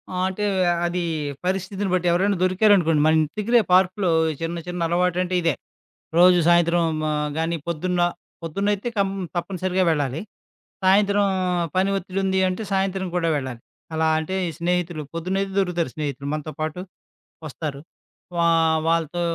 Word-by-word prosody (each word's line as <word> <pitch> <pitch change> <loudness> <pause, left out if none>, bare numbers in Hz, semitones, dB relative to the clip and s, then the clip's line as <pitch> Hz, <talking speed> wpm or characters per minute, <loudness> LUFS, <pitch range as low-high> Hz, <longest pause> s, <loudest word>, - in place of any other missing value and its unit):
ఆ! - - -3
అంటే 190 +2 -4 0.4
అది 175 +1 -1 0.4
పరిస్థితిని 190 +1 -2
బట్టి 180 -1 +1
ఎవరైనా 190 +3 +2
దొరికారనుకోండి. 185 -5 +4
మనం 160 0 +4 0.2
తిరిగే 235 +3 +3
పార్కులో, 185 0 +3 0.3
చిన్న 165 +1 -3
చిన్న 180 0 -4
అలవాటంటే 180 +1 0
ఇదే. 165 -4 +2 0.6
రోజు 180 0 +7
సాయంత్రం 170 0 +4 0.2
మా 155 - 0 0.3
గాని 165 +1 0
పొద్దున్న 175 +2 -1 0.4
పొద్దున్నయితే 200 +6 -1
కంప్ 195 -1 +1 0.2
తప్పనిసరిగా 185 +1 -1
వెళ్ళాలి. 145 0 -1 0.6
సాయంత్రం 200 +1 +4 0.5
పని 190 +1 +2
ఒత్తిడుంది 190 0 -1
అంటే 185 +4 -4
సాయంత్రం 190 -1 0
కూడా 165 -2 +1
వెళ్ళాలి. 130 -4 -4 0.4
అలా 160 0 +1
అంటే 175 +4 -4
ఈ - - -5
స్నేహితులు 175 -2 -1
పొద్దున్నయితే 190 +4 -2
దొరుకుతారు 175 -5 0
స్నేహితులు. 140 -3 -4
మనతో 155 0 -4
పాటు 155 +3 -3 0.7
వస్తారు. 145 -1 -5 0.6
వా 170 - +3 0.4
వాళ్ళతో 165 +1 0
180 Hz, 130 wpm, -23 LUFS, 165-190 Hz, 0.7 s, రోజు